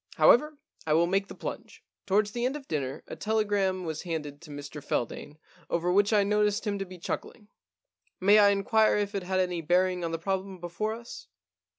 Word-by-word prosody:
However, 300 +4 +5 0.3
I 155 - +3
will 165 +2 +4
make 195 +3 0
the - - -10
plunge. - - -7 0.2
Towards 205 +1 +2
the 240 +2 -3
end 255 +3 0
of 285 -2 -8
dinner 135 -4 -3
a - - -8
telegram 205 -4 0
was 160 -1 -4
handed 155 -4 -5
to 170 - -13
Mr 145 0 -8
Feldane 145 +3 -3 0.3
over 175 +1 0
which 200 +3 +3
I 210 -2 +4
noticed 210 +1 +1
him 200 -1 -1
to 195 - -4
be 185 0 -10
chuckling. 205 +4 -6 0.7
May 205 +3 +6
I 205 -1 +7
inquire 210 +2 +3
if 205 0 -1
it 200 - -2
had 185 +1 -1
any 180 -2 0
bearing 180 +2 +2
on 165 - -2
the 165 - -1
problem 190 +2 -3
before 175 +6 -3
us 355 - -10
195 Hz, 200 wpm, -28 LUFS, 170-210 Hz, 0.7 s, I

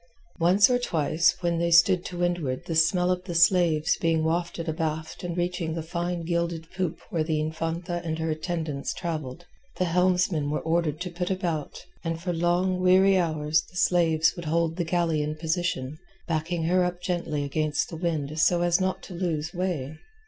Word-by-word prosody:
Once 185 +6 +5
or 250 -1 +2
twice 165 -5 +1
when 170 -1 0
they 170 0 +1
stood 170 +2 +5
to 180 - -7
windward 175 -7 -1
the 165 - -3
smell 180 +3 +3
of 180 0 -1
the 175 -3 -5
slaves 170 -2 +3
being 165 -1 +1
wafted 170 +1 -1
abaft 160 0 -3
and 175 0 -4
reaching 175 -2 -2
the 165 - -3
fine 175 +1 -3
gilded 170 -1 -1
poop 180 -3 -2
where 165 -2 +1
the 155 -1 -1
Infanta 165 +3 -3
and 160 -1 -2
her 160 0 -1
attendants 155 -3 -3
travelled, 165 -2 -5 0.3
the 185 - +1
helmsmen 180 -3 +1
were 150 - -1
ordered 160 -2 0
to 180 0 -4
put 175 +1 -3
about, 175 -6 -3 0.2
and 165 -1 -2
for 175 +1 -2
long 175 +2 +1
weary 190 +1 +5
hours 155 -3 +1
the 180 - -11
slaves 165 -3 +3
would 175 -2 -7
hold 165 +1 0
the 175 - -1
galley 165 -2 0
in 150 +1 -2
position, 160 -3 -2 0.3
backing 165 +1 -1
her 180 +3 +3
up 180 0 -2
gently 170 -5 -2
against 150 +1 -1
the - - -5
wind 155 -3 -2
so 175 +1 +3
as 175 +1 +2
not 185 0 -1
to - - -9
lose 170 -3 -2
way. 160 -5 -3
170 Hz, 185 wpm, -26 LUFS, 160-180 Hz, 0.3 s, Once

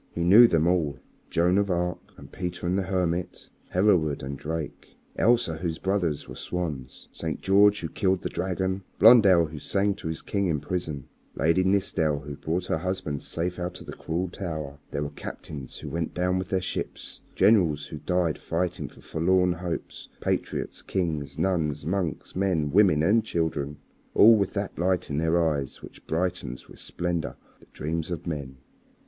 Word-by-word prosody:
He 85 - -1
knew 105 +8 +9
them 80 -6 +2
all. 85 -6 +1 0.3
Joan 90 +3 +3
of 100 -1 0
Arc 90 -1 -2
and - - -13
Peter 90 -1 -4
the 95 +2 +1
Hermit, 90 -2 -2 0.2
Hereward 90 -8 +2
and 70 +1 -4
Drake, 80 +1 -6 0.2
Elsa 115 -9 +3
whose 80 -1 -3
brothers 90 -6 -1
were - - -8
swans, 75 -7 -5
St. 80 -2 -4
George 100 +1 +4
who 80 - -2
killed 95 +1 0
the - - 0
dragon, 95 +1 -2 0.2
Blondel 100 -6 +7
who 75 -1 -7
sang 100 +6 +1
to 80 - -8
his 80 0 -4
king 100 -2 0
in 80 -4 0
prison, 75 -3 -4 0.3
Lady 85 +4 +3
Nithsdale 90 -6 +1
who 70 0 -7
brought 80 +5 -2
her 80 - -1
husband 90 -5 -2
safe 90 +2 -3
out 90 0 -4
of - - -11
the - - -7
cruel 85 +3 -2
Tower. 80 -6 -5
There 70 - -2
were 75 - -4
captains 70 -4 -7
who - - -7
went 85 0 -3
down 90 +1 +1
with 95 - -5
their 95 -1 +1
ships, - - -4
generals 85 -9 +4
who 75 - -8
died 90 -3 0
fighting 85 +1 -2
for - - -17
forlorn 90 +2 +2
hopes, 85 0 -5
patriots, - - -2
kings, 80 -6 -2
nuns, 80 -6 0
monks, 90 -2 -2
men, 90 -6 +1
women, 90 -5 +5
and 110 +6 +4
children 80 -6 -2 0.4
all 115 +2 +8
with 100 -3 0
that 100 -4 -3
light 90 -2 0
in 70 - 0
their 80 +2 +2
eyes 75 -5 -1
which - - -13
brightens 80 -7 -2
with - - -14
splendor 85 -2 -3 0.2
the - - -20
dreams 80 +3 -3
of 85 -2 -4
men. 70 -5 -5
85 Hz, 175 wpm, -26 LUFS, 80-95 Hz, 0.4 s, knew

